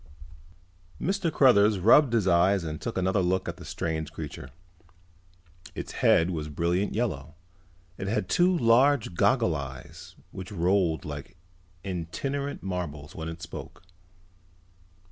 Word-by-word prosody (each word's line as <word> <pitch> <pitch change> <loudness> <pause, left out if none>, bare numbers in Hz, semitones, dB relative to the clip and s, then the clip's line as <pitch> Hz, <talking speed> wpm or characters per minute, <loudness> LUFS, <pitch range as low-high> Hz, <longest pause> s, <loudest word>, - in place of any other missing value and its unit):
Mr. 190 -1 -1
Cruthers 110 -8 +5
rubbed 115 +7 +5
his 110 -5 +2
eyes 90 +2 +3
and 80 -1 -5
took 115 - -4
another 95 +1 +1
look 95 +1 0
at - - -5
the - - -11
strange 80 -2 -3
creature. 65 - -8 1.3
Its - - -6
head 85 +3 +3
was 75 -3 -4
a - - -9
brilliant 85 +7 -1
yellow. 80 - -3 0.6
It 95 - -4
had 110 - -1
two 180 0 +3
large 120 - +3
goggle 115 -2 +2
eyes 65 -2 -8 0.2
which 95 +3 -8
rolled 90 -3 +1
like 75 +3 -8 0.5
itinerant 135 - -4
marbles 85 -6 -5
when 80 0 -6
it 80 0 -8
spoke. - - -9
95 Hz, 130 wpm, -27 LUFS, 80-115 Hz, 1.3 s, Cruthers